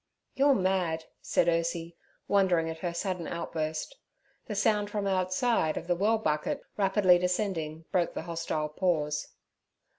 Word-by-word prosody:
'You're 275 0 +4
mad' 185 -5 0 0.2
said - - +1
Ursie, 170 0 0 0.3
wondering 185 -5 +3
at 160 - -8
her 175 +1 -2
sudden 180 0 -3
outburst. 165 - -3 0.5
The 210 - -4
sound 205 0 +2
from 205 -1 -2
outside 185 -1 +1
of - - -4
the 175 - +2
well 210 +5 +2
bucket 220 - -1
rapidly 190 -3 +4
descending 175 -4 -2
broke 175 -2 +1
the - - -3
hostile 165 -2 -2
pause. 150 -3 0
180 Hz, 140 wpm, -29 LUFS, 165-200 Hz, 0.5 s, You're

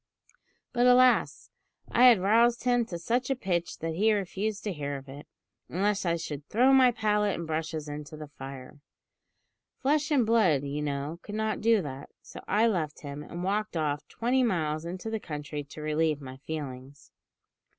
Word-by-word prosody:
But, 245 0 +3
alas! 250 0 +4 0.4
I 245 - +5
had 240 -5 +8
roused 230 +4 +3
him 245 -1 +2
to 180 -6 -6
such 245 +8 -1
a 270 - +1
pitch 175 -8 -2
that 165 0 -3
he 210 +6 +3
refused 205 +1 -2
to 205 - -2
hear 145 -3 -4
of 135 +1 -12
it, 140 +2 -10 0.4
unless 195 +1 0
I 170 - +2
should 150 -3 -5
`_throw 255 +5 +4
my 260 -2 +7
palette 210 -3 +1
and 170 - -5
brushes 160 -1 -3
into 150 +1 -7
the 155 - -7
fire_!' 135 +1 -9 1.0
Flesh 295 +2 +1
and 275 -6 +3
blood, 200 -11 +3
you 145 +1 -3
know, 145 +3 -3
could 210 - -8
not 220 0 -1
do 225 -3 +3
that, 140 -1 -7
so - - -10
I 215 +3 +3
left 170 -9 -1
him, 145 0 -7
and 170 +3 -7
walked 205 0 -1
off 145 -2 -2
twenty 250 +3 0
miles 160 -9 0
into 185 +6 -5
the 220 - -2
country 150 -3 -6
to 150 - -10
relieve 155 0 +1
my 130 -2 -9
feelings. 140 -2 -8
175 Hz, 180 wpm, -28 LUFS, 150-220 Hz, 1.0 s, had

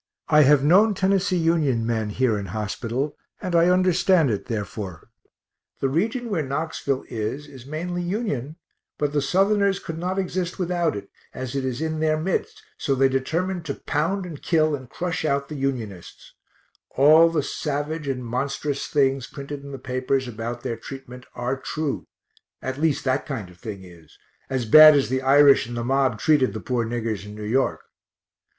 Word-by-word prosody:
I 150 -1 +6
have 145 -1 +5
known 200 +8 +5
Tennessee 190 0 +1
Union 155 -8 +1
men 110 -2 -1
here 120 +1 +1
in 100 -1 -4
hospital, 115 - -3 0.2
and 180 -3 -3
I 170 +1 +5
understand 180 -4 +3
it, 105 - -3
therefore 100 -5 -5 0.7
the 135 - 0
region 225 - -1
where 175 -6 +1
Knoxville 140 -1 -2
is 115 +6 -4
is 135 -3 -13
mainly 175 +4 -3
Union, 175 - -3 0.4
but 145 -1 -1
the 145 - +2
Southerners 195 +6 +2
could 165 0 -7
not 185 +2 -2
exist 185 -2 -2
without 175 -3 0
it, 100 -1 -8 0.2
as 130 +1 -5
it 135 - -1
is 130 +1 -3
in 160 -1 -2
their 155 0 +2
midst, 180 +4 -2 0.2
so 135 - 0
they 135 0 +4
determined 170 +7 -1
to 140 - -3
pound 180 +6 -1
and 160 -5 -8
kill 155 -3 +2
and 130 -3 -10
crush 180 -1 -3
out 140 -2 0
the 155 - -6
Unionists 120 - -5 0.6
all 155 +5 +6
the 160 -3 0
savage 150 +1 -3
and 125 -2 -3
monstrous 135 +4 -2
things 135 -3 +1
printed 140 +1 -7
in 140 0 -10
the 135 - -6
papers 130 0 -1
about 120 +1 -5
their 115 - -3
treatment 125 +1 -10
are 125 +2 -1
true, 155 -3 -3 0.5
at 130 +2 -5
least 160 -3 +1
that 130 +1 0
kind 115 -10 -5
of 90 - -19
thing 105 -5 -7
is, 85 -4 -16 0.3
as 130 -3 -1
bad 155 +6 +9
as 140 -3 +2
the 130 +1 0
Irish 140 -1 +6
in 120 - -6
the 120 - -2
mob 130 -2 +1
treated 150 -5 +3
the - - -3
poor 120 +2 -1
niggers 115 -3 -3
in 105 +1 -9
New 105 - -7
York. 125 +6 0
140 Hz, 180 wpm, -24 LUFS, 125-165 Hz, 0.7 s, bad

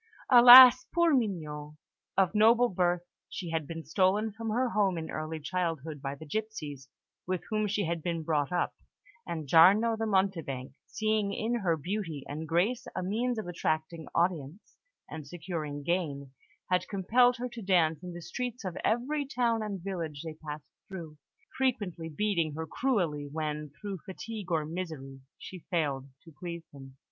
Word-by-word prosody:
Alas, 250 +1 +10
poor 340 -2 +4
Mignon! 155 - -2 0.4
Of 195 0 +3
noble 230 +3 +5
birth, 175 -2 0 0.3
she 175 -3 -6
had 160 -3 -2
been 165 -2 -7
stolen 190 +7 +2
from 225 +2 -5
her 245 +3 +1
home 200 -5 +1
in 160 -1 -5
early 155 +1 -4
childhood 160 -3 -3
by 140 0 -4
the 160 - -11
gipsies 150 -8 -5 0.4
with 185 -2 -2
whom 215 -1 +1
she 205 -1 -1
had 170 0 -2
been 165 0 -2
brought 150 -2 0
up; 180 - 0 0.5
and 160 -3 -4
Giarno 200 - +6
the 220 0 -2
Mountebank, 170 -11 -1
seeing 215 -2 0
in 220 +4 -2
her 170 -6 +1
beauty 165 -3 -4
and 155 +3 -5
grace 185 +10 0
a - - -2
means 230 +6 -1
of 220 - -3
attracting 160 -1 -2
audiences 170 0 -1 0.3
and 155 -2 -8
securing 155 -3 -5
gain, 145 -5 -2 0.4
had 180 0 +2
compelled 245 +6 +3
her 250 +1 -3
to 235 -1 -9
dance 170 -5 +2
in 180 -1 -7
the 175 0 -8
streets 245 +4 -5
of 180 -2 -4
every 265 +6 0
town 240 -4 0
and 200 -4 -5
village 165 -7 -4
they 160 -1 -6
passed 155 -1 -8 0.2
through, 165 -6 -9 0.4
frequently 205 -11 -1
beating 165 -3 -1
her 160 +1 -4
cruelly 165 - -1
when, 150 -1 -3
through 200 -3 -5
fatigue 210 0 -7
or 160 -2 +1
misery, 155 -5 -6 0.2
she 185 -3 -10
failed 140 -6 -1
to 165 - -14
please 170 -2 -6
him. 135 -1 -12
175 Hz, 165 wpm, -30 LUFS, 155-215 Hz, 0.5 s, Alas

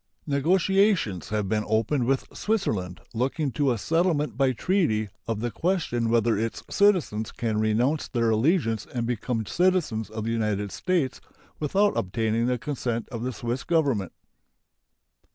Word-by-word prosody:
Negotiations 170 - +2
have 105 -2 -1
been 105 +2 0
opened 115 +4 +1
with 135 0 +1
Switzerland 105 - -1
looking 135 +5 -1
to 140 0 +1
a 120 - 0
settlement 165 - +1
by 135 -1 +3
treaty 115 - +1 0.2
of 110 -2 -2
the 120 0 -2
question 160 - 0
whether 115 -1 +3
its 115 +2 -3
citizens 175 - +2
can 110 -2 -2
renounce 120 +8 +1
their 115 -2 +1
allegiance 115 - +1
and 120 -2 -2
become 115 -1 -2
citizens 165 - +1
of 110 0 -5
the 115 - -1
United 105 -3 -1
States 175 -8 -1 0.4
without 195 +7 +2
obtaining 110 +4 0
the 125 0 +1
consent 120 -4 -3
of 115 -4 -5
the 125 +2 -2
Swiss 120 +2 -3
Government. 140 - +1
120 Hz, 145 wpm, -26 LUFS, 110-155 Hz, 0.4 s, by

